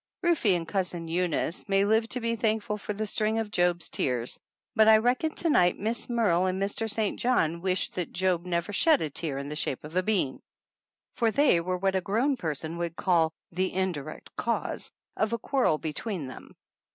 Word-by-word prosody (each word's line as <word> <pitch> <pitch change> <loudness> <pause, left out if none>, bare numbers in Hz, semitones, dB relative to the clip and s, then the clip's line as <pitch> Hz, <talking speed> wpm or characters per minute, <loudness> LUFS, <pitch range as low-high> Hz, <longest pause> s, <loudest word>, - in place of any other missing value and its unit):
Rufe 345 -9 +2
and 165 -1 -6
Cousin 180 -3 -2
Eunice 175 +2 -1
may 195 0 +3
live 220 +2 +2
to 250 - -2
be 230 -1 -1
thank 220 -1 0
ful 210 - -2
for 205 - -5
the 210 +1 -2
string 215 +1 0
of 220 -2 -2
Job's 175 -3 +1
Tears, 125 -2 -1 0.4
but 220 -1 +6
I 220 0 +8
reckon 245 +7 +1
to 340 - 0
night 180 -8 +4
Miss 225 +4 -3
Merle 195 -7 +2
and 185 +1 -1
Mr. 205 +3 -1
St. 215 -1 -1
John 170 -10 +1
wish 185 0 0
that 180 -2 -4
Job 180 -2 +1
never 175 +2 -2
shed 310 +7 +4
a 155 - -3
tear 145 -2 -3
in 140 0 -4
the 150 - -5
shape 135 -3 -2
of 155 +3 -9
a 185 - +4
bean, 185 -9 0 0.7
for 230 -2 +2
they 280 - +4
were 180 +2 -2
what 195 +1 0
a 190 - +2
grown 235 +10 +1
person 160 - -3
would 170 -1 -3
call 170 -4 +2 0.2
"the 185 +2 -1
indirect 185 -7 -4
cause" - - -2 0.3
of 215 +2 0
a - - +1
quarrel 260 - +1
between 160 +2 -4
them. 130 - -11
190 Hz, 200 wpm, -28 LUFS, 170-220 Hz, 0.7 s, I